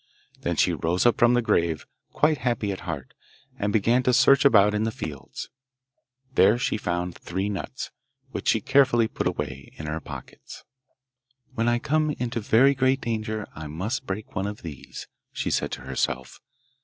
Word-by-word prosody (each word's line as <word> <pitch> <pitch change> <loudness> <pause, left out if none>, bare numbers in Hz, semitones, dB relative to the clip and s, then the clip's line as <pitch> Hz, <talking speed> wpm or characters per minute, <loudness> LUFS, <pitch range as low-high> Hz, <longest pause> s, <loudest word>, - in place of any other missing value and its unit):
Then - - -1
she - - +3
rose 85 +5 0
up 120 - +4
from 120 +1 +5
the 120 - +2
grave, 85 -7 +1 0.3
quite 150 -1 +2
happy 120 -4 0
at 95 - -5
heart, 70 -5 -5 0.5
and 100 0 0
began 115 +4 +3
to 125 0 +2
search 135 0 +6
about 105 -6 +6
in 105 - 0
the 110 - +1
fields. 75 -10 -7 0.8
There 105 -2 +5
she 120 - 0
found 90 -3 -2
three 95 +4 -3
nuts, 100 - -5 0.4
which - - -5
she - - +3
carefully 130 -5 +4
put - - -2
away - - -4
in 80 - -7
her 75 +1 -3
pocket. - - -10 0.9
'When 115 -2 0
I 120 0 +3
come 155 +5 +1
into 120 -1 -2
very 120 +6 +4
great 130 0 +2
danger 110 -2 -2
I 80 0 -7
must 105 - -3
break 100 +3 -5
one 95 +2 -1
of 105 0 -7
these,' 75 -6 -8 0.3
she - - -2
said - - 0
to - - -5
herself. 65 -1 -3
110 Hz, 175 wpm, -25 LUFS, 90-120 Hz, 0.9 s, search